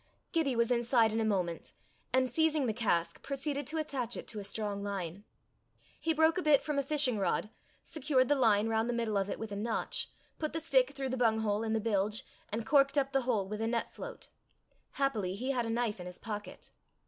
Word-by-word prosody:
Gibbie 300 -6 +1
was 235 +1 +2
inside 235 -2 +3
in 225 - +1
a - - +2
moment, 185 -6 -1 0.4
and 260 0 +3
seizing 310 +2 +2
the 225 - 0
cask, 200 -7 0
proceeded 280 0 -3
to 315 +3 -2
attach 265 -6 -2
to - - -4
it - - -6
a 210 -2 -5
strong 205 0 -3
line. 200 -1 -4 0.7
He 325 - +1
broke 320 +2 +3
a - - -1
bit 300 -4 +4
from 295 -2 0
a - - +1
fishing 275 -5 +2
rod, 210 +2 0 0.3
secured 270 -4 +1
the 290 - +4
line 225 -6 +3
round 225 +1 +1
the - - +1
middle 230 -3 -1
of 195 0 +1
it - - -3
with 220 -1 -6
a - - -3
notch, 220 +3 -1 0.3
put 310 -1 -2
the 325 - -1
stick 275 -4 +3
through 270 -1 -3
the 260 - -2
bunghole 220 -3 +2
in 220 -1 -1
the 225 - +2
bilge, 210 -1 0 0.2
and 220 +1 -3
corked 275 0 +4
up 275 -1 +2
the 270 -1 +2
hole 225 -6 0
with 210 +2 -4
a 225 - +1
net 230 0 -1
float. - - -8 0.6
Happily 220 -10 0
he 255 +6 -2
had 245 -3 0
a - - -3
knife 225 -3 -1
in 180 - -6
his 180 - -7
pocket. 205 -3 -7
235 Hz, 220 wpm, -32 LUFS, 210-275 Hz, 0.7 s, bit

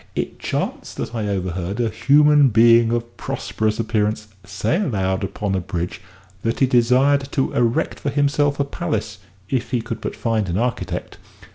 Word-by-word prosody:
it - - -3
chanced - - -3
that - - -4
I 110 -3 -2
overheard 95 +1 -3
a 120 - +2
human 145 0 +5
being 115 +1 +5
of 120 0 -3
prosperous 110 0 -2
appearance 110 -1 -1
say 110 - -1
aloud 95 - -1
upon 100 +1 -3
a 95 - +1
bridge 90 -1 -4 0.4
that 115 +2 -1
he 135 - +5
desired 130 +3 +3
to 135 - 0
erect 120 -1 0
for 140 - -2
himself 145 0 +1
a - - +3
palace 140 - -3 0.3
if 125 +1 -2
he 125 - 0
could 115 0 -5
but - - -4
find 110 -4 -1
an 85 - -1
architect. 120 +2 -3
115 Hz, 165 wpm, -21 LUFS, 105-135 Hz, 0.4 s, human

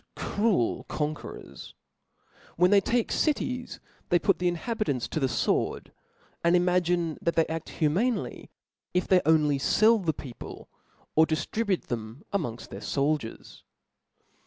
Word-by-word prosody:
cruel 205 - 0
conquerors: 150 0 -5 0.8
when 180 +3 +4
they 200 -1 +6
take 235 +3 0
cities, 255 -5 -1 0.3
they 175 - +5
put^^^ 185 0 +2
the 180 - +1
inhabitants 175 - -1
to - - -2
the 135 - +2
Tword, - - -1 0.5
and 170 +1 +4
imagine 175 -2 +1
that 170 - 0
they 165 - +4
aft 160 0 -5
humanely, 190 +11 -1 0.5
if 180 - +1
they 185 -1 +5
only 150 -3 +4
fell 220 +10 +4
the 170 -5 0
people, 130 -5 -10 0.5
or 160 +1 +6
di 160 - +1
ftribute 205 +3 -1
them 115 +3 -6
amongft 125 - -3
their - - -7
foldiers. 140 -4 -2
170 Hz, 135 wpm, -27 LUFS, 150-200 Hz, 0.8 s, they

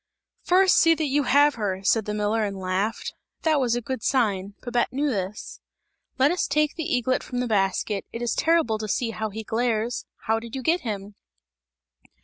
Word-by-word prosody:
"First 370 +1 +4
see 330 -1 +5
that 315 - -1
you 285 0 +1
have 290 +3 +5
her!" 190 -2 -2
said 220 +1 +2
the 210 - -3
miller 210 +1 0
and 200 -2 -3
laughed; 190 +4 -2 0.3
that 315 -3 +3
was 245 -3 +1
a 240 - -1
good 260 -1 -4
sign; 200 -7 0
Babette 245 -1 0
knew 280 +2 0
this. 195 -1 -5 0.6
"Let 270 +3 +4
us 355 - 0
take 300 +1 +1
the 320 - -4
eaglet 255 +1 +1
from 250 - -6
the 250 - 0
basket, 200 -1 0
it 230 - -5
is 240 - 0
terrible 320 -10 +2
to 215 - -4
see 230 +3 -1
how 220 0 -3
he 220 +2 -6
glares! 230 +1 -1 0.2
How 225 0 +1
did 230 +1 -9
you 265 - -4
get 335 +6 +2
him?" 205 -3 -5
235 Hz, 195 wpm, -25 LUFS, 210-275 Hz, 0.6 s, see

